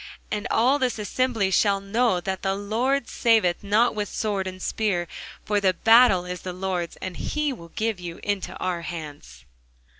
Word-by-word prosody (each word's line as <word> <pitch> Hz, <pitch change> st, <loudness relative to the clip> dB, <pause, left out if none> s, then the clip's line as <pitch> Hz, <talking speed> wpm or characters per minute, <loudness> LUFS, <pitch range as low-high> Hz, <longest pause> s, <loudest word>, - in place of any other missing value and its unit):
And 210 Hz, +2 st, -2 dB
all 255 Hz, +6 st, +3 dB
this 255 Hz, -3 st, 0 dB
assembly 220 Hz, -2 st, 0 dB
shall 200 Hz, +1 st, +3 dB
know 200 Hz, 0 st, +1 dB
that 190 Hz, +1 st, -3 dB
the 195 Hz, 0 st, 0 dB
Lord 235 Hz, +7 st, 0 dB
saveth 220 Hz, -7 st, +2 dB
not 210 Hz, +4 st, +3 dB
with 210 Hz, -1 st, -3 dB
sword 200 Hz, -3 st, -2 dB
and 185 Hz, 0 st, -7 dB
spear: 185 Hz, -3 st, -1 dB, 0.4 s
for 205 Hz, -1 st, +1 dB
the 190 Hz, -2 st, +2 dB
battle 225 Hz, -4 st, +5 dB
is 180 Hz, 0 st, -5 dB
the 180 Hz, -, -5 dB
Lord's, 180 Hz, -2 st, -3 dB
and 185 Hz, -2 st, -6 dB
he 300 Hz, -2 st, -1 dB
will 170 Hz, -8 st, -11 dB
give 220 Hz, -3 st, -1 dB
you 170 Hz, -1 st, -7 dB
into 205 Hz, -2 st, -2 dB
our 180 Hz, -2 st, -2 dB
hands. 150 Hz, -, -8 dB
200 Hz, 175 wpm, -25 LUFS, 180-225 Hz, 0.4 s, battle